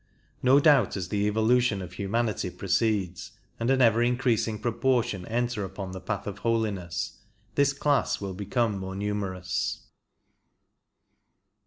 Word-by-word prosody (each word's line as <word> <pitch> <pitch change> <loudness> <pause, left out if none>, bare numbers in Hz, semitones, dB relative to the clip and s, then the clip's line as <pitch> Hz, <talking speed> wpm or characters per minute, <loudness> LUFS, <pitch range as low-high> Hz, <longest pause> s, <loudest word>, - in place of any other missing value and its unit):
No 130 +2 +6
doubt 140 - +4
as 90 -2 -4
the 105 -1 +1
evolution 110 0 +2
of 90 -1 -7
human 105 +5 0
ity 105 -3 -2
proceeds, 100 -1 -1 0.3
and 115 +2 0
an 135 -1 +4
ever 115 0 +4
increasing 120 -3 +1
proportion 120 -4 0
enter 120 -2 -1
upon 95 0 -6
the 95 0 -7
Path 105 -2 -3
of 100 0 -6
Holiness, 105 -7 -2 0.3
this 140 0 +3
class 140 0 +1
will 100 -2 -4
become 105 +2 -1
more 95 0 -5
numer 100 -2 -2
ous. 90 0 -2
105 Hz, 140 wpm, -27 LUFS, 95-120 Hz, 0.3 s, No